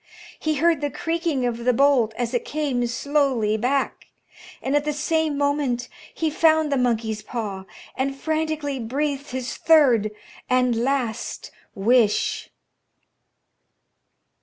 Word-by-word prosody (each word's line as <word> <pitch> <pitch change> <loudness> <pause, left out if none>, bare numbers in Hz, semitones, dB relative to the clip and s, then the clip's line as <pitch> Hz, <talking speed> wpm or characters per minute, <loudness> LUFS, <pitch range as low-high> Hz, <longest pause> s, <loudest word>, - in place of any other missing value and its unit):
He 310 -1 0
heard 325 +1 +2
the 290 - 0
creaking 330 -3 -1
of 240 -1 -1
the 250 +1 +3
bolt 245 -4 +3
as 240 0 -2
it 245 - 0
came 275 -5 -1
slowly 250 -3 +1
back, 255 +5 -1 0.5
and 270 +2 -1
at 290 - +2
the 300 0 -1
same 315 0 0
moment 285 -4 0 0.2
he 320 -2 -1
found 315 -1 +3
the - - +2
monkey's 225 -4 0
paw, 210 -4 -5 0.3
and 275 +1 -2
frantically 310 -3 -2
breathed 280 +4 -2
his 255 -1 -4
third 260 -10 +4 0.4
and 250 -1 +3
last 240 -1 -2 0.2
wish. 220 +1 +2
270 Hz, 125 wpm, -23 LUFS, 240-295 Hz, 0.5 s, third